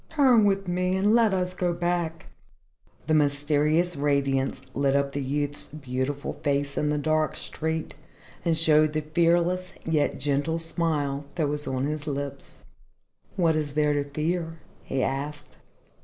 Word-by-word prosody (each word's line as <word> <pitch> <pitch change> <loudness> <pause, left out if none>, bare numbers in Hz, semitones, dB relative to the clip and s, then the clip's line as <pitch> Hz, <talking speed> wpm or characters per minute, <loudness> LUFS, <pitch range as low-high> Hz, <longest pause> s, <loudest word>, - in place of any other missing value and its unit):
Turn 260 -8 +5
with 195 -1 +1
me 180 +1 0
and 205 +3 +3
let 230 -2 +5
us 180 -1 -1
go 180 -1 0
back." 175 -1 -2 0.8
The 155 - +1
mysterious 150 +3 +2
radiance 140 -2 0
lit 140 0 +1
up 140 0 +1
the 145 - -3
youth's 145 +2 -2
beautiful 140 0 -3
face 140 -1 -1
in 150 - 0
the 150 - +1
dark 155 +1 +1
street 160 0 -3 0.5
and 165 -2 +1
showed 155 -1 +4
the 155 - 0
fearless 175 +4 +1
yet 160 -2 +1
gentle 145 +3 0
smile 155 -4 -1
that 155 -4 0
was 150 0 -3
on 130 0 -1
his 150 +1 -3
lips. 140 -1 -5 0.7
"What 165 -4 +3
is 150 -2 -2
there 150 -1 +3
to 145 0 +1
fear?" 165 +3 -2 0.2
he 135 -1 -2
asked. 140 +2 -4
155 Hz, 150 wpm, -26 LUFS, 145-170 Hz, 0.8 s, Turn